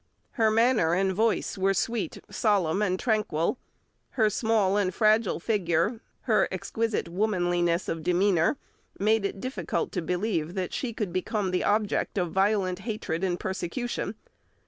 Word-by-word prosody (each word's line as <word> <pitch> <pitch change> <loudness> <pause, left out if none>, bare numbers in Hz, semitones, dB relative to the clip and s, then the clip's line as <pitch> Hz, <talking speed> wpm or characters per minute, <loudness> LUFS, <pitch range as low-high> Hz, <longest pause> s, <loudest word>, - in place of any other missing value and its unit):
Her 225 -3 +2
manner 220 -7 +3
and 190 +1 +1
voice 220 -1 0
were 195 +1 +2
sweet, 230 +1 -1
solemn, 200 -4 +1
and 185 -3 0
tranquil; 215 -3 0 0.6
her 215 -3 +4
small 215 -3 +2
and 200 -3 +1
fragile 215 0 +2
figure, 205 +3 0 0.2
her - - +2
exquisite 225 -5 -2
womanliness 175 -2 0
of 165 - -3
demeanour, 180 - +2 0.4
made 215 +1 +2
it 200 - -3
difficult 265 - -3
to 180 - -2
believe 175 -1 -2
that 185 -2 -3
she 255 - -2
could 210 -6 -4
become 190 +1 -1
the 180 - 0
object 210 0 0
of 175 -3 0
violent 190 -1 +1
hatred 210 -7 -3
and 180 -2 0
persecution. 195 +4 -3
195 Hz, 145 wpm, -27 LUFS, 180-220 Hz, 0.6 s, her